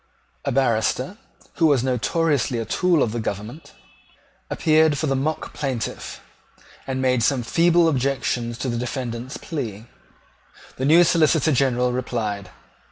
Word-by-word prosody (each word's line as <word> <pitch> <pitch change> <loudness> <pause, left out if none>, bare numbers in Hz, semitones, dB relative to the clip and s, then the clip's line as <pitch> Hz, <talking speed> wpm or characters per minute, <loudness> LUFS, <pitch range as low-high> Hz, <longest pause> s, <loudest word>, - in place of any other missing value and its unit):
A - - 0
barrister, 130 - 0 0.4
who 165 - +4
was 140 -5 +3
notoriously 130 +1 0
a 115 - -2
tool 175 - +2
of 110 - -1
the 120 - -3
government, 110 +7 -6 0.8
appeared 155 -1 +3
for 155 - -1
the 135 -2 0
mock 150 +4 -2
plaintiff, 130 -6 -4 0.7
and 130 0 -2
made 125 -2 +2
some 125 +1 +1
feeble 170 +6 +3
objections 130 -4 -1
to 130 - -4
the 120 -1 -2
defendant's 125 +1 -4
plea. 115 - -5 0.9
The 130 - -2
new 165 +5 +6
Solicitor 160 -2 +3
General 125 -2 +2
replied. 110 -6 -3
130 Hz, 135 wpm, -22 LUFS, 120-155 Hz, 0.9 s, new